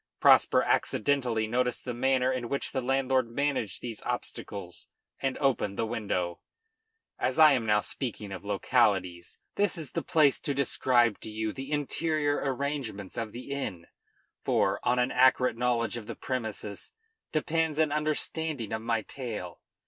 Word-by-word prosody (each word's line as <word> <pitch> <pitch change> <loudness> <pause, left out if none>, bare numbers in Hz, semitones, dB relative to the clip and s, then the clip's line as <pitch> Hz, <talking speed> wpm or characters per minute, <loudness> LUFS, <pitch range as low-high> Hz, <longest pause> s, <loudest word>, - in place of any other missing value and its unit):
Prosper - - +6
accidentally 120 -3 +1
noticed 125 +2 -1
the 125 - -3
manner 130 +1 +2
in 125 -2 -3
which 140 - -2
the 130 - -1
landlord 130 -1 +1
managed 125 -6 -1
these 115 -3 -5
obstacles 90 -4 -5 0.3
and 135 -1 -1
opened 125 -8 0
the 115 - 0
window. 100 -6 -2 0.8
As - - 0
I 155 -1 +8
am 120 -4 0
now 105 0 +4
speaking 110 -6 -4
of 95 -1 -6
localities, 100 -4 +1 0.2
this 205 -2 +2
is 155 -4 -6
the 165 - -2
place 150 -4 +3
to 140 - -2
describe 120 -4 +2
to - - -7
you 110 0 -3
the 135 +2 -7
interior 150 0 0
arrangements 135 -7 -3
of 115 -2 -3
the 125 +5 -8
inn; 95 -12 -3 0.6
for, - - +2
on 125 - +1
an 125 +1 +2
accurate 130 -1 +4
knowledge 120 -2 0
of 110 -3 -8
the - - -5
premises 110 -5 -4 0.4
depends 160 0 0
an 155 -2 +3
understanding 150 -4 -2
of 110 - -2
my 115 -1 0
tale. 110 -10 -6
125 Hz, 155 wpm, -29 LUFS, 110-140 Hz, 0.8 s, I